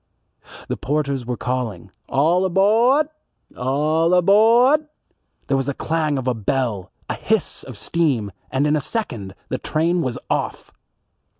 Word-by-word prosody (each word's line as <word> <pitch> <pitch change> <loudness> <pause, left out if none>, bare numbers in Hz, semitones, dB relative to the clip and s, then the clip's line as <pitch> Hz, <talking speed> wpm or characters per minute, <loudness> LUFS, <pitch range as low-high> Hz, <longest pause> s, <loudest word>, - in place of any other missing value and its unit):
The - - -3
porters 140 -3 -2
were 125 -1 -2
calling, 115 -8 -3 0.2
"All 160 +7 +3
abawd! 230 - +3 0.5
All 150 +6 +1
abawd." 235 - +5 0.6
There 135 - 0
was 135 0 -1
the 140 - -2
clang 155 -3 -1
of 130 -1 -4
a 125 - +2
bell, 110 -3 -2 0.2
a - - -2
hiss - - -1
of - - -10
steam, 135 -12 0 0.2
and 135 +2 0
in 150 +1 +2
a 150 - 0
second 115 - -4
the 130 - -2
train 170 +3 0
was 125 -5 -2
off. - - -3
145 Hz, 140 wpm, -21 LUFS, 125-180 Hz, 0.6 s, abawd